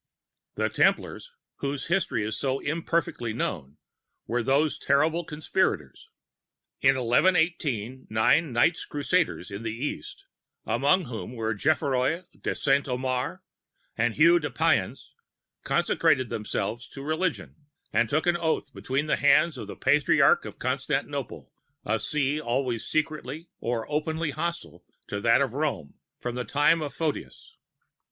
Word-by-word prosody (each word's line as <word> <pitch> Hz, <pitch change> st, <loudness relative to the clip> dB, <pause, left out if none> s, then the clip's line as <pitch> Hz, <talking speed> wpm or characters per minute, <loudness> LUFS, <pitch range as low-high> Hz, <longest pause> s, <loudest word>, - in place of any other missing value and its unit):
"The -, -, +1 dB
Templars, -, -, +1 dB, 0.3 s
whose 140 Hz, -1 st, -3 dB
history 170 Hz, -, 0 dB
is 110 Hz, 0 st, -2 dB
so 135 Hz, +3 st, -1 dB
imperfectly 160 Hz, -6 st, -1 dB
known, 75 Hz, -, -4 dB, 0.5 s
were 120 Hz, +1 st, 0 dB
those 140 Hz, +5 st, +1 dB
terrible 155 Hz, +4 st, +2 dB
conspirators. 150 Hz, -, -2 dB, 0.7 s
In 135 Hz, 0 st, +5 dB
1118, 130 Hz, -, +1 dB
nine 125 Hz, +8 st, +3 dB
Knights 120 Hz, +9 st, +2 dB
Crusaders 150 Hz, -, -1 dB
in 100 Hz, +2 st, -6 dB
the 115 Hz, -, -3 dB
East, 135 Hz, +6 st, -5 dB, 0.4 s
among 145 Hz, +7 st, +2 dB
whom 120 Hz, -1 st, -6 dB
were 110 Hz, -1 st, -1 dB
Geoffroi 140 Hz, -, +1 dB
de -, -, -3 dB
Saint 140 Hz, -1 st, +2 dB
Omer 125 Hz, 0 st, -2 dB, 0.5 s
and 115 Hz, 0 st, 0 dB
Hugues 170 Hz, +3 st, +6 dB
de -, -, -2 dB
Payens, -, -, 0 dB, 0.5 s
consecrated 140 Hz, -7 st, +2 dB
themselves 105 Hz, +2 st, -3 dB
to 135 Hz, -, -9 dB
religion, 160 Hz, +3 st, -2 dB, 0.4 s
and 120 Hz, -, +2 dB
took 155 Hz, +7 st, +1 dB
an 175 Hz, -1 st, +3 dB
oath 160 Hz, -4 st, -1 dB
between 135 Hz, +4 st, -2 dB
the 155 Hz, -, +1 dB
hands 155 Hz, +2 st, +4 dB
of 110 Hz, -5 st, -7 dB
the -, -, -7 dB
Patriarch 145 Hz, +2 st, +4 dB
of -, -, -8 dB
Constantinople, -, -, -3 dB, 0.3 s
a 110 Hz, +2 st, 0 dB
See 150 Hz, +3 st, 0 dB
always 120 Hz, -2 st, -1 dB
secretly 155 Hz, 0 st, -2 dB
or 115 Hz, -1 st, -2 dB
openly 155 Hz, +1 st, -1 dB
hostile 155 Hz, -, -4 dB, 0.3 s
to 100 Hz, -, -3 dB
that 115 Hz, +4 st, +4 dB
of 135 Hz, -4 st, 0 dB
Rome 140 Hz, -, -2 dB, 0.3 s
from 120 Hz, -, -4 dB
the 125 Hz, 0 st, -3 dB
time 145 Hz, +5 st, +3 dB
of 145 Hz, -2 st, -3 dB
Photius. 160 Hz, -3 st, -4 dB
140 Hz, 135 wpm, -27 LUFS, 120-155 Hz, 0.7 s, Hugues